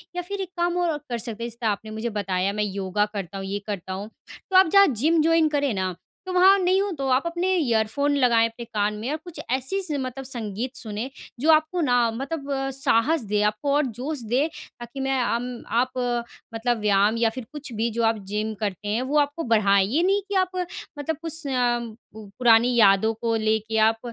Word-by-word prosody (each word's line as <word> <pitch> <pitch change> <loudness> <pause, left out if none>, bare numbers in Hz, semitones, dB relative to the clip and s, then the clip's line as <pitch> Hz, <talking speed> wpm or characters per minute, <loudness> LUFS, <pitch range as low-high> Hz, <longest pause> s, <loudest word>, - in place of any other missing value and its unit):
या 355 - -1
फ़िर 395 +3 -5
एक 375 - -4
काम 345 0 0
और 350 -1 +1
आप 295 - -5
कर 240 - -1
सकते 230 -1 -5
हैं, 235 - -3
जैसे 235 +1 -7
आपने 215 0 -1
मुझे 220 +2 -3
बताया 195 -2 -1
मैं 210 0 -1
योगा 200 0 -1
करता 195 -2 -5
हूँ, 195 - -5
ये 200 +1 -3
करता 190 -3 -4
हूँ, 200 +3 -6 0.4
तो 380 - -2
आप 380 - +7
जहाँ 395 0 +8
जिम 310 +6 +2
जॉइन 325 0 +4
करें 285 -5 0
ना, 185 -1 -2 0.3
तो 370 - -4
वहाँ 380 +2 +6
नहीं 370 +1 +3
हो 400 0 -1
तो 270 -1 -2
आप 260 +4 +3
अपने 345 +2 -1
ईयरफोन 280 0 +1
लगाएँ 235 -4 +4
अपने 235 +1 -9
कान 210 -2 -1
में 230 +5 -4
और 310 - -1
कुछ 350 -3 -10
ऐसी 265 +10 0
स 365 - -5
मतलब 260 +1 -5
संगीत 240 0 -5
सुनें 225 +1 -5 0.3
जो 310 +5 +4
आपको 315 +3 +2
ना 250 -6 +2 0.2
मतलब 275 +1 -3
साहस 270 +3 +2
दे, 210 0 0
आपको 215 +7 0
और 295 -1 +3
जोश 260 +5 -4
दे 265 +6 +2 0.3
ताकि 240 +3 -8
मैं 270 -1 0
अम 240 +2 -1 0.3
आप 255 +1 +1 0.6
मतलब 240 +1 0
व्यायाम 205 +1 +3
या 230 -1 +3
फिर 235 +1 -7
कुछ 295 -5 -8
भी 225 +2 0
जो - - +2
आप 225 0 +2
जिम 215 +1 -1
करते 205 -1 -3
हैं, 215 +4 0
वो 270 +4 0
आपको 290 +3 0
बढ़ाएँ। 200 -4 +3
ये 300 +10 +1
नहीं 395 +2 +2
कि 405 - -2
आप 365 - -24 0.5
मतलब 305 +2 -2
कुछ 325 -1 -3
अ, 245 -2 +1 0.4
पुरानी 225 +3 +3
यादों 215 0 +5
को 225 +1 -1
लेके 220 0 0
आप 225 - -12
240 Hz, 215 wpm, -24 LUFS, 215-295 Hz, 0.6 s, जहाँ